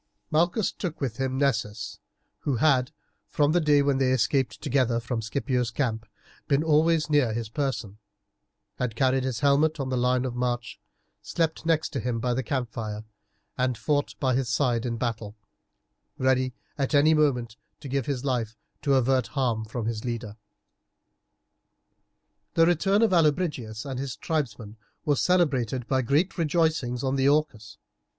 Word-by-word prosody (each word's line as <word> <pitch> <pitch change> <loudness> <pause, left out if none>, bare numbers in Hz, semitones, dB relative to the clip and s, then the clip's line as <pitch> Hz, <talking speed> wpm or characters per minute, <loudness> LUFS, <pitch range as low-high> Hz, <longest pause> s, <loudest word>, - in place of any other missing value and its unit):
Malchus 175 +6 +2
took 175 -5 -5
with 125 -5 -3
him 130 0 -1
Nessus, 110 -6 -1 0.4
who 140 - -1
had, 130 -1 +3 0.4
from 145 0 +2
the 175 +2 +3
day 145 -2 +4
when 140 -1 +1
they 130 -1 +2
escaped 130 -1 +1
together 125 -3 +1
from 120 0 -3
Scipio's 125 +1 -1
camp, 115 -5 -2 0.4
been 140 +1 +2
always 160 +1 +3
near 145 -7 +2
his 115 -1 -3
person, 115 -6 -3 0.8
had 125 -4 -2
carried 130 +1 +2
his 130 -2 -3
helmet 145 +2 +3
on 135 -1 -2
the 130 - 0
line 125 +1 +1
of 125 - -3
march, 120 -1 -3 0.4
slept 160 -1 -2
next 160 -1 +2
to 135 - -3
him 120 0 -2
by 125 +1 0
the 130 - 0
campfire, 115 -4 -4 0.6
and 125 -2 +1
fought 145 +6 -1
by 130 -2 +1
his 130 -1 0
side 120 -2 +1
in 115 -1 -2
battle, 110 -3 -3 0.8
ready 130 -1 +1 0.2
at 140 +2 0
any 150 +3 +5
moment 125 -7 +1 0.2
to 150 - -9
give 135 -1 -2
his 140 -2 -2
life 115 -4 -1 0.2
to 140 -2 +2
avert 130 -1 +2
harm 125 -6 -1
from 110 +1 -5
his 110 -1 -3
leader. 115 -4 -4 2.2
The 165 - +6
return 195 +5 +3
of 220 -4 +3
Allobrigius 150 -10 +1
and 135 -2 -4
his 135 -3 -4
tribesmen 115 -9 -3 0.3
was 145 -3 +2
celebrated 130 -9 +1
by 130 -1 +2
great 150 +10 +1
rejoicings 155 -6 +1
on 135 0 0
the 135 +1 +4
Orcus. 140 -8 -1
130 Hz, 160 wpm, -26 LUFS, 120-150 Hz, 2.2 s, The